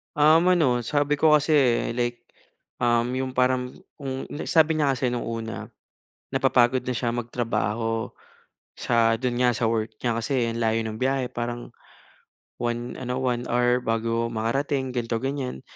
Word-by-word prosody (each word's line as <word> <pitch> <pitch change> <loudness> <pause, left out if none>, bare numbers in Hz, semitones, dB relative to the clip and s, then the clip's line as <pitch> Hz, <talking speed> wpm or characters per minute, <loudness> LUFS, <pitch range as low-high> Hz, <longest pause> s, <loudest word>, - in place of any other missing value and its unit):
Um, 155 +4 +5
ano 130 -8 +2
sabi 145 +1 +1
ko 155 -1 +6
kasi 140 -6 +2
like, 120 0 -2 0.6
um, 120 0 +2
'yong 130 0 -2
parang 125 0 +1 0.2
kung 135 -1 -4
li 145 - -5
sabi 160 -1 +4
niya 140 -3 +2
kasi 130 -1 0
no'ng 120 - -3
una, 115 -1 -5 0.7
napapagod 125 +1 +3
na 125 - -1
siya 120 -1 -1
magtrabaho 115 -1 -2 0.7
sa 115 -1 +2
do'n 125 -1 -2
nga 125 -1 +4
sa 120 - 0
work 110 -1 -2
niya 115 -2 +1
kasi 120 -1 0
ang 115 +1 -4
layo 115 0 +1
ng 110 0 -5
biyahe 130 -1 0
parang 120 0 -4 0.9
1 120 0 -2
ano 125 0 -3
1 125 -1 -1
hour 125 +1 +2
bago 115 0 -1
makarating 130 +4 -1
ganito 115 -2 -2
ganyan. 135 - -3
120 Hz, 150 wpm, -25 LUFS, 115-130 Hz, 0.9 s, ko